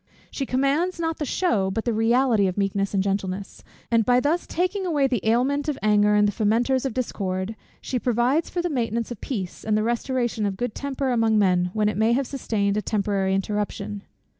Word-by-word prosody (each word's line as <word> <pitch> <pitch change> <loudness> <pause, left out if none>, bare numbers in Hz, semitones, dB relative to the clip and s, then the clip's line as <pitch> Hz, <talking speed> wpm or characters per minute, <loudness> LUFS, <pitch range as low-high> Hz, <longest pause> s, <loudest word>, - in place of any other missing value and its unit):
She 275 - -3
commands 285 +8 +1
not 325 -1 -2
the 300 - -2
shew, 220 - +1
but 225 +3 -3
the 235 - +1
reality 225 -1 +3
of 185 - -3
meekness 200 0 0
and 190 - +2
gentleness; 195 0 -3 0.3
and 230 -1 +4
by 245 +2 +4
thus 310 +6 0
taking 370 +3 -1
away 305 -6 +1
the 250 -7 0
aliment 265 +7 +1
of 295 - -2
anger 210 0 +4
and 210 0 +4
the - - +1
fomenters 240 +5 +1
of 250 - -6
discord, 195 -4 -2 0.3
she 255 - -2
provides 245 +7 +1
for 350 - -2
the 350 - 0
maintenance 235 -3 -1
of 235 - -7
peace, 195 -9 -5
and 215 -1 +1
the 215 - +1
restoration 240 -1 -1
of 195 -1 -4
good 245 -1 -2
temper 275 -1 -2
among 225 -2 +2
men, 180 -3 +3
when 215 -1 +1
it 210 - -1
may 220 +2 +3
have 270 +3 +1
sustained 210 -7 -1
a - - +1
temporary 200 -2 0
interruption. 205 0 -3
225 Hz, 205 wpm, -24 LUFS, 205-265 Hz, 0.3 s, and